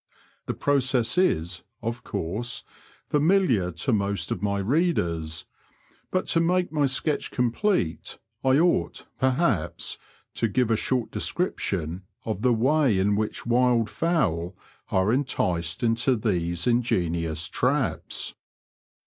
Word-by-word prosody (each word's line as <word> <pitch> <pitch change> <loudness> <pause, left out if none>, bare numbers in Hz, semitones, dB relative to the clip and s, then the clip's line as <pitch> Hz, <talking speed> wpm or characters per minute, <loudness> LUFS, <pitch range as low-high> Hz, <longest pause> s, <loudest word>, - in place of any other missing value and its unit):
The - - -2
process 130 -4 +1
is, 85 - +1 0.2
of 115 +1 -3
course, 110 +9 -2 0.5
faraihar 150 - +3
to 130 - +1
most 100 -1 -1
of 90 - -2
my 100 -1 0
readers, 95 - 0 0.6
but 185 - 0
to 165 - +3
make 180 +2 +1
my 150 -3 +2
sketch 140 +3 0
complete 125 - 0 0.3
I 130 0 +4
ought, 160 - +1
perhaps, 130 - 0 0.3
to 115 - 0
give 115 +2 +1
a - - +4
short 120 +2 -1
description 95 - -1 0.2
of 110 -3 -3
the 125 +1 +3
way 130 0 +3
in 100 +2 +2
which 105 +1 -2
wild 120 -2 +2
fowl 100 - 0 0.3
are 95 +4 +2
enticed 90 - -1
into 115 +3 +2
these 85 -6 -1
ingenious 85 -9 0
traps. - - -1
115 Hz, 120 wpm, -26 LUFS, 90-135 Hz, 0.6 s, I